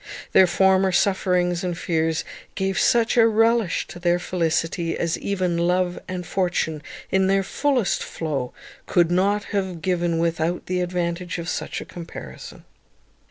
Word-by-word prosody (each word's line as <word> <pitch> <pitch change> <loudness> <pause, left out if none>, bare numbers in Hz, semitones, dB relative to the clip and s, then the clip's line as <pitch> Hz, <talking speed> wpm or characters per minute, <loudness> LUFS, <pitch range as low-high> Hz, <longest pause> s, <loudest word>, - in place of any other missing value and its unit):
Their 190 - +6
former 190 +1 +3
sufferings 180 -1 +1
and 175 -2 -2
fears 160 -2 0 0.3
gave 190 0 -1
such 235 0 +3
a 230 -1 +7
relish 225 -3 +2
to 175 - -9
their 175 0 +2
felicity 165 -1 -1
as 170 -1 0
even 185 -4 -1
love 180 +1 +1
and 180 -1 -5
fortune, 175 -4 -1 0.3
in 190 0 +3
their 195 0 +2
fullest 260 0 0
flow, 145 -6 -3 0.4
could 175 -2 +3
not 200 +3 +2
have 190 -4 -1
given 175 -2 0
without 165 +1 -1
the 180 0 -1
advantage 175 0 -2
of 170 -1 -5
such - - -3
a - - -8
comparison. 170 -1 -10
180 Hz, 145 wpm, -23 LUFS, 170-190 Hz, 0.4 s, a